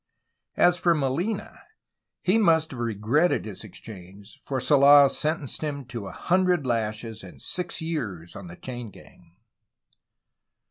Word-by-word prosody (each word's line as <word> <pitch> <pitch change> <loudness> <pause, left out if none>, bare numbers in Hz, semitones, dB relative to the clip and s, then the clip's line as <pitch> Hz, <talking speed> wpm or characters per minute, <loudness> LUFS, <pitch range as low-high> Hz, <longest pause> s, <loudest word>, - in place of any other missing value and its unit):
As 175 0 +4
for 170 -1 +3
Molina 165 +9 -2 0.6
he 195 +5 +3
must 160 -6 +3
have 130 - -8
regretted 120 - +1
his 105 -1 -6
exchange, 100 +2 -12
for 135 -2 -2
Sola 140 +1 +7
sentenced 155 -3 -1
him 145 -3 -4
to 115 -5 -7
a - - -7
hundred 180 -4 +1
lashes 110 -2 -2
and 95 - -12
six 180 -2 -4
years 100 - -4
on 100 -2 -9
the 85 - -10
chain 120 +1 -7
gang. 85 -3 -18
130 Hz, 135 wpm, -25 LUFS, 105-160 Hz, 0.6 s, Sola